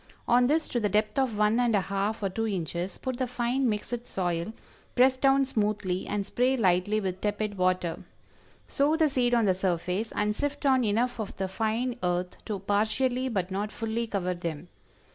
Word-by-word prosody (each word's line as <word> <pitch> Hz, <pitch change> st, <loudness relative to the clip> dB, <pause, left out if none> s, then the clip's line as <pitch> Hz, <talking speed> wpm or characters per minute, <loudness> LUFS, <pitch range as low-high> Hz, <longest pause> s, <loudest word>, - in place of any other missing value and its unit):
On 245 Hz, +1 st, +5 dB
this 310 Hz, +3 st, +1 dB
to 240 Hz, -, 0 dB
the 210 Hz, -2 st, +1 dB
depth 210 Hz, +5 st, +1 dB
of 255 Hz, -6 st, 0 dB
one 210 Hz, +2 st, +3 dB
and 240 Hz, -3 st, +3 dB
a 200 Hz, -, +3 dB
half 200 Hz, +3 st, -2 dB
or 195 Hz, -, +1 dB
two 225 Hz, +4 st, -2 dB
inches, 180 Hz, -1 st, -3 dB
put 260 Hz, -2 st, -4 dB
the 255 Hz, -, 0 dB
fine 245 Hz, +1 st, 0 dB
mixed 230 Hz, +3 st, -3 dB
soil, 175 Hz, +1 st, -2 dB, 0.4 s
press 260 Hz, +1 st, +5 dB
down 270 Hz, +1 st, +3 dB
smoothly 210 Hz, -6 st, -1 dB
and 205 Hz, -1 st, -1 dB
spray 255 Hz, +5 st, +1 dB
lightly 190 Hz, 0 st, +2 dB
with 190 Hz, -2 st, -3 dB
tepid 210 Hz, 0 st, -1 dB
water. 185 Hz, -2 st, 0 dB, 0.6 s
Sow 290 Hz, +2 st, +2 dB
the 315 Hz, -3 st, +2 dB
seed 245 Hz, -2 st, +2 dB
on 230 Hz, -2 st, +3 dB
the 190 Hz, -, +4 dB
surface, 185 Hz, +3 st, -1 dB
and 210 Hz, 0 st, +1 dB
sift 290 Hz, +3 st, -3 dB
on 260 Hz, -2 st, +4 dB
enough 235 Hz, +3 st, 0 dB
of 215 Hz, -, -5 dB
the 190 Hz, -, -1 dB
fine 225 Hz, +5 st, -1 dB
earth 180 Hz, 0 st, -1 dB
to 210 Hz, -3 st, -2 dB
partially 220 Hz, +6 st, 0 dB
but 190 Hz, -5 st, -2 dB
not 205 Hz, +2 st, -2 dB
fully 230 Hz, +1 st, -2 dB
cover 185 Hz, -4 st, -1 dB
them. 170 Hz, -1 st, -5 dB
215 Hz, 190 wpm, -28 LUFS, 190-245 Hz, 0.6 s, On